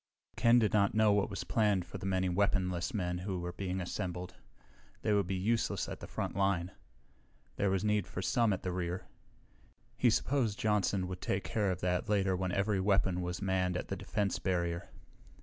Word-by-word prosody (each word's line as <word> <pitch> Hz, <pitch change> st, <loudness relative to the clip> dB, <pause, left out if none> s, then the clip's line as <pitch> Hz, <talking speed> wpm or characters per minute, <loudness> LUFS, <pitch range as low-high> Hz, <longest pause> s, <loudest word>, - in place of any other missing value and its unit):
Ken 115 Hz, +1 st, +5 dB
did 110 Hz, -3 st, +3 dB
not 100 Hz, -1 st, +3 dB
know 110 Hz, -1 st, +5 dB
what 100 Hz, 0 st, +2 dB
was 100 Hz, -, -4 dB
planned 105 Hz, -5 st, +1 dB
for -, -, -8 dB
the 95 Hz, -, -4 dB
many 95 Hz, -1 st, +1 dB
weaponless 90 Hz, -2 st, +1 dB
men 90 Hz, -4 st, -2 dB
who 95 Hz, 0 st, -3 dB
were 90 Hz, 0 st, -4 dB
being 95 Hz, 0 st, -3 dB
assembled. 90 Hz, 0 st, -4 dB, 0.7 s
They 105 Hz, -, +2 dB
would 100 Hz, -3 st, +2 dB
be 95 Hz, -, -1 dB
useless 110 Hz, +5 st, 0 dB
at -, -, -6 dB
the -, -, -8 dB
frontline. 95 Hz, -2 st, -1 dB, 0.9 s
There 100 Hz, -, +2 dB
was 95 Hz, 0 st, 0 dB
need 105 Hz, -3 st, +1 dB
for 90 Hz, -, -5 dB
some 115 Hz, 0 st, +2 dB
at 95 Hz, -, -2 dB
the 90 Hz, -, -1 dB
rear. 90 Hz, 0 st, -3 dB, 0.9 s
He 125 Hz, -, +4 dB
supposed 115 Hz, -2 st, +1 dB
Johnson 100 Hz, -3 st, +1 dB
would 90 Hz, -1 st, -6 dB
take 95 Hz, 0 st, -1 dB
care 100 Hz, +5 st, 0 dB
of 90 Hz, -1 st, -2 dB
that 90 Hz, +1 st, 0 dB
later 95 Hz, -2 st, +2 dB
when 90 Hz, 0 st, -1 dB
every 100 Hz, +1 st, +1 dB
weapon 95 Hz, -2 st, +2 dB
was 90 Hz, +2 st, -3 dB
manned 90 Hz, -2 st, +1 dB
at -, -, -5 dB
the -, -, -1 dB
defense 105 Hz, -3 st, -1 dB
barrier. 85 Hz, -2 st, -1 dB
95 Hz, 190 wpm, -33 LUFS, 90-105 Hz, 0.9 s, Ken